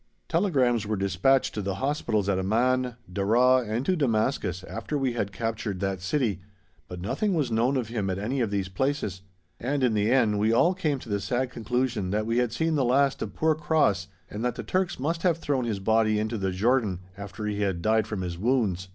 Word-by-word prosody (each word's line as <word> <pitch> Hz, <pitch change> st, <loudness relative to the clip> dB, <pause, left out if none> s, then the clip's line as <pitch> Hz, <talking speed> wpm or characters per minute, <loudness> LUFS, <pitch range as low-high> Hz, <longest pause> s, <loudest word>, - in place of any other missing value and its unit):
Telegrams 130 Hz, -, +1 dB
were 110 Hz, -, 0 dB
dispatched 100 Hz, +8 st, +2 dB
to 105 Hz, -, -3 dB
the 100 Hz, -1 st, -2 dB
hospitals 120 Hz, -5 st, -1 dB
at 95 Hz, -2 st, +1 dB
Amman, 125 Hz, +5 st, +1 dB
Deraa, 120 Hz, +8 st, +3 dB
and 115 Hz, +5 st, -1 dB
to 185 Hz, -, +2 dB
Damascus 110 Hz, -, 0 dB
after 110 Hz, +7 st, -4 dB
we 135 Hz, -3 st, 0 dB
had 105 Hz, -4 st, -2 dB
captured 110 Hz, -2 st, -3 dB
that 95 Hz, -1 st, -2 dB
city, 105 Hz, -1 st, 0 dB, 0.5 s
but 90 Hz, -, -7 dB
nothing 185 Hz, -, -1 dB
was 145 Hz, -7 st, 0 dB
known 120 Hz, +5 st, +2 dB
of 120 Hz, -4 st, -2 dB
him 105 Hz, -4 st, -2 dB
at 95 Hz, -, -1 dB
any 115 Hz, +7 st, -2 dB
of 115 Hz, -, 0 dB
these 100 Hz, -2 st, -1 dB
places, 100 Hz, -2 st, -2 dB, 0.4 s
and 135 Hz, +3 st, -1 dB
in 125 Hz, -3 st, +3 dB
the 105 Hz, 0 st, +1 dB
end 115 Hz, -6 st, +3 dB
we 110 Hz, +2 st, +2 dB
all 165 Hz, +10 st, +4 dB
came 155 Hz, -6 st, -1 dB
to 125 Hz, -, -11 dB
the 100 Hz, -1 st, 0 dB
sad 125 Hz, +6 st, -1 dB
conclusion 120 Hz, -4 st, -1 dB
that 105 Hz, +2 st, 0 dB
we 115 Hz, +2 st, +1 dB
had 125 Hz, -2 st, +1 dB
seen 160 Hz, +7 st, 0 dB
the 145 Hz, -3 st, +2 dB
last 135 Hz, +2 st, +2 dB
of -, -, -5 dB
poor 160 Hz, 0 st, +2 dB
Cross 150 Hz, -, +1 dB, 0.2 s
and 105 Hz, +2 st, -6 dB
that 125 Hz, -1 st, 0 dB
the -, -, -5 dB
Turks 185 Hz, -5 st, -1 dB
must 165 Hz, +5 st, -1 dB
have 170 Hz, -2 st, +2 dB
thrown 140 Hz, -6 st, -1 dB
his 110 Hz, -4 st, -1 dB
body 110 Hz, +1 st, +2 dB
into 110 Hz, +1 st, -2 dB
the 95 Hz, -1 st, 0 dB
Jordan 105 Hz, -1 st, +1 dB
after 100 Hz, +1 st, -7 dB
he 105 Hz, -1 st, -2 dB
had 95 Hz, -4 st, -1 dB
died 110 Hz, -1 st, +2 dB
from 105 Hz, -3 st, -4 dB
his 85 Hz, -2 st, -4 dB
wounds. 105 Hz, -6 st, 0 dB
115 Hz, 215 wpm, -26 LUFS, 100-130 Hz, 0.5 s, all